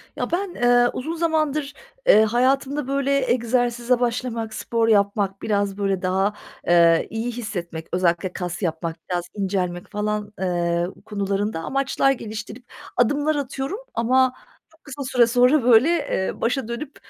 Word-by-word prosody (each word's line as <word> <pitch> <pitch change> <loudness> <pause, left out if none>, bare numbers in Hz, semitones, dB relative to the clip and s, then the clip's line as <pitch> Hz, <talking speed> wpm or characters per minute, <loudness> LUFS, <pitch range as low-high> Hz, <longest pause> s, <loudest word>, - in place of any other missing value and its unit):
Ya, - - -3
ben, 370 +1 -1
eee, 245 0 +4
uzun 315 +6 -4
zamandır, 310 -3 0 0.3
eee, 215 - +7
hayatımda, 265 +5 +1
böyle, 275 -1 +1
egzersize 245 0 +1
başlamak, 235 -2 -2
spor 230 +1 -1
yapmak, 200 -2 +1
biraz, 200 -2 -1
böyle, 195 -2 -1
daha, 190 +2 +1 0.3
eee, 170 -1 +5
iyi 225 +2 -3
hissetmek, 175 -9 -6
özellikle 180 0 0
kas 180 0 -4
yapmak, 165 -2 -2
biraz 175 -1 -1
incelmek 185 -3 -2
falan, 210 0 -2
eee, 175 -2 0 0.2
konularında 200 -2 -2
amaçlar 270 +7 +1
geliştirip 220 -1 -6 0.3
adımlar 290 +5 +2
atıyorum 280 - -3
ama 255 +2 +3 0.4
çok 320 0 -27
kısa 280 0 -7
süre 250 -2 +3
sonra, 250 +4 +4
böyle, 245 +4 +6
eee, 335 - -1
başa 245 0 0
dönüp, 265 +5 -6
230 Hz, 135 wpm, -23 LUFS, 195-265 Hz, 0.4 s, eee